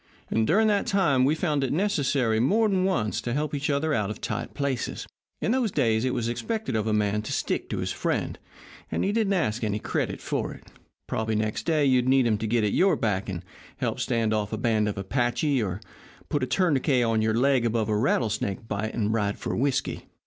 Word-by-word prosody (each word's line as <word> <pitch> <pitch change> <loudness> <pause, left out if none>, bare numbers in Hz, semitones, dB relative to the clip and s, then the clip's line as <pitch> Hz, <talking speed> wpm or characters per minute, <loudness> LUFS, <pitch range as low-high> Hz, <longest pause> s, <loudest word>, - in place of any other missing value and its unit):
And 110 0 +2
during 220 +7 +4
that 205 -2 +1
time 150 -10 +3
we've 150 +4 +2
found 150 -5 0
it 130 - -1
necessary 140 - +1
more 210 - +3
than 190 -2 +1
once 140 - 0
to 120 - -3
help 150 +2 -1
each 145 +1 -1
other 150 +2 +1
out 105 -6 0
of 105 - -6
tight - - -4
places. 140 -3 -2 0.4
In - - +1
those 245 -4 +1
days 115 -6 +1
it 130 - +1
was 115 - -1
expected 120 - -2
of 110 0 0
a - - +1
man 105 0 +1
to 105 - -6
stick - - -2
to - - -2
his - - -2
friend, - - -2 0.5
and - - 0
he 200 - +1
didn't 210 -2 +1
ask 120 - 0
any 105 -1 0
credit - - -2
for - - -3
it. - - -15 0.4
Probably 110 0 -1
next 110 +6 -2
day 155 -3 +3
you'd 130 -2 +3
need 135 -1 +4
him 110 -3 +1
to 110 - -2
get 115 0 +1
at 105 - +1
your 190 -2 +4
back 100 -6 -1
and 90 -1 -5 0.3
help - - -2
stand 115 -2 0
off 105 -1 -1
a 110 - -2
band 110 -2 +1
of 100 - -5
Apaches, 120 +6 0
or 95 -2 -2 0.5
put 145 - 0
a 130 - 0
tourniquet 135 -4 +2
on 115 -1 +1
your 110 0 +1
leg 130 0 +3
above 115 -2 0
a 105 - +1
rattlesnake 110 -2 0
bite 105 +1 -3
and 110 -1 0
ride 105 -2 0
for - - -3
whisky. 135 +1 -1
120 Hz, 220 wpm, -26 LUFS, 110-150 Hz, 0.5 s, during